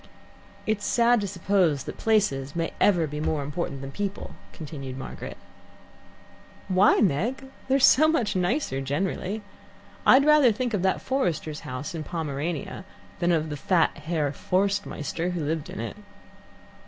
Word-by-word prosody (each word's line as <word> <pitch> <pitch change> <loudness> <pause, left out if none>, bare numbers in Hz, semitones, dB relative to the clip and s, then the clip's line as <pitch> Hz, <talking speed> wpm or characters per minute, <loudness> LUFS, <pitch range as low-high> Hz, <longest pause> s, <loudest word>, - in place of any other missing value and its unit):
"It 215 -1 0
is - - -11
sad 235 -1 +3
to 200 - -2
suppose 180 -6 +1
that - - -8
places 145 -11 +1
may 165 -1 -2
ever 175 -5 +4
be 150 0 -5
more 155 -1 -1
important 140 -1 -4
than 135 0 -6
people," 200 +4 -4 0.2
continued 140 -4 -7
Margaret. 130 - -7 1.3
"Why, 190 +2 +4
Meg? 220 - +1 0.2
They're 270 +1 +3
so 275 +3 +6
much 280 -12 +1
nicer 180 - 0
generally. 185 +8 -2 0.6
I'd 270 +2 +6
rather 300 -5 +6
think 240 +2 -2
of 205 - 0
that 190 0 0
forester's 165 - -1
house 130 +5 -6
in 160 -2 -4
Pomerania 155 +1 -4 0.4
than 175 0 +2
of 160 -2 0
the 150 - -4
fat 165 +3 +2
Herr 155 -1 -1
Forstmeister 180 -1 -1
who 165 -4 -2
lived 155 0 -2
in - - -7
it." 115 - -5
175 Hz, 150 wpm, -26 LUFS, 150-205 Hz, 1.3 s, so